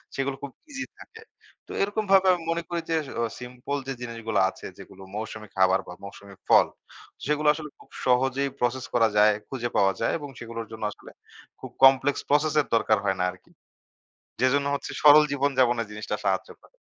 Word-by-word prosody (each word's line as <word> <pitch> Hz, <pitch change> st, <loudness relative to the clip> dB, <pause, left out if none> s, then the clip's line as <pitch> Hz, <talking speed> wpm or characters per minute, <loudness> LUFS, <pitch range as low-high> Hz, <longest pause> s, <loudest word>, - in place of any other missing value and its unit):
সেগুলো 135 Hz, 0 st, -1 dB
খুব 140 Hz, -, -5 dB, 0.2 s
ইজি 275 Hz, 0 st, -4 dB
থাকে। 445 Hz, 0 st, -13 dB, 0.5 s
তো -, -, -11 dB
এরকমভাবে 195 Hz, -2 st, +2 dB
আমি 175 Hz, -2 st, -4 dB
মনে 170 Hz, 0 st, -2 dB
করি 170 Hz, -1 st, -2 dB
যে, 165 Hz, -, +2 dB, 0.2 s
অহ 115 Hz, -, 0 dB
সিম্পল 125 Hz, +3 st, -5 dB
যে 135 Hz, -, -2 dB
জিনিসগুলা 115 Hz, -2 st, -2 dB
আছে, -, -, -12 dB
যেগুলো 95 Hz, -, -13 dB
মৌসুমি 110 Hz, 0 st, -6 dB
খাবার 95 Hz, 0 st, +4 dB
বা 90 Hz, -, -8 dB
মৌসুমি 100 Hz, 0 st, -11 dB
ফল, -, -, +6 dB, 0.6 s
সেগুলো 150 Hz, +1 st, 0 dB
আসলে 150 Hz, 0 st, -7 dB
খুব -, -, -19 dB, 0.2 s
সহজেই 130 Hz, +2 st, +2 dB
প্রসেস 125 Hz, +1 st, -1 dB
করা 115 Hz, -2 st, +4 dB
যায়, 105 Hz, +1 st, +6 dB, 0.2 s
খুঁজে 120 Hz, -3 st, -3 dB
পাওয়া 95 Hz, -1 st, +4 dB
যায় -, -, +1 dB
এবং 145 Hz, -2 st, -8 dB
সেগুলোর 115 Hz, -1 st, -6 dB
জন্য 110 Hz, -1 st, -8 dB
আসলে -, -, -14 dB, 0.5 s
খুব -, -, -9 dB
কমপ্লেক্স 135 Hz, +1 st, +5 dB
প্রসেসের 150 Hz, 0 st, +2 dB
দরকার 110 Hz, -1 st, +3 dB
হয় 95 Hz, -1 st, +1 dB
না 90 Hz, -, +1 dB
আরকি। 90 Hz, -, -20 dB, 0.9 s
যেজন্য 140 Hz, +2 st, +2 dB
হচ্ছে -, -, -6 dB
সরল 150 Hz, +1 st, +8 dB
জীবনযাপনের 130 Hz, -5 st, +1 dB
জিনিসটা 105 Hz, 0 st, -4 dB
সাহায্য -, -, 0 dB
করে। -, -, -23 dB
130 Hz, 175 wpm, -26 LUFS, 115-150 Hz, 0.9 s, সরল